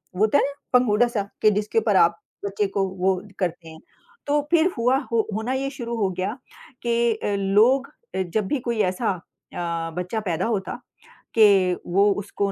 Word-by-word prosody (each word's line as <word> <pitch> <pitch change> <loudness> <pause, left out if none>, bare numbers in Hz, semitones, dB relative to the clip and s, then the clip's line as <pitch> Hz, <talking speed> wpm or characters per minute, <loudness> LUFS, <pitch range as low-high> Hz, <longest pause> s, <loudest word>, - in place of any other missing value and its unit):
वो - - -6
होता 220 +7 +3
है - - +3
ना 280 - -2 0.2
पंघूड़ा-सा 235 -2 +2 0.2
कि 215 - +6
जिसके 210 +2 0
ऊपर 215 -2 +1
आप 170 -2 +4 0.3
बच्चे 200 +1 -1
को 195 0 0
वो 190 +1 +3 0.2
करते 175 -3 -3
हैं। 160 0 -12 0.5
तो 295 +1 +2
फ़िर 345 +2 +4
हुआ 245 +3 +3
हो 225 -2 +1
होना 220 +4 -2
ये 270 +1 -1
शुरू 240 -4 -5
हो 200 -3 +1
गया 190 +7 -2 0.5
कि 235 -1 +1 0.2
लोग 220 +8 +3 0.3
अ, 190 - 0
जब 190 +3 -1
भी 290 - 0
कोई 235 -2 -1
ऐसा 215 +5 -2
अ, 170 -2 -6
बच्चा 180 +5 -2
पैदा 185 -3 -2
होता 210 -4 -2 0.6
कि 195 -4 +5
वो 200 +3 +4
उसको 200 0 -2
210 Hz, 175 wpm, -23 LUFS, 190-235 Hz, 0.6 s, कि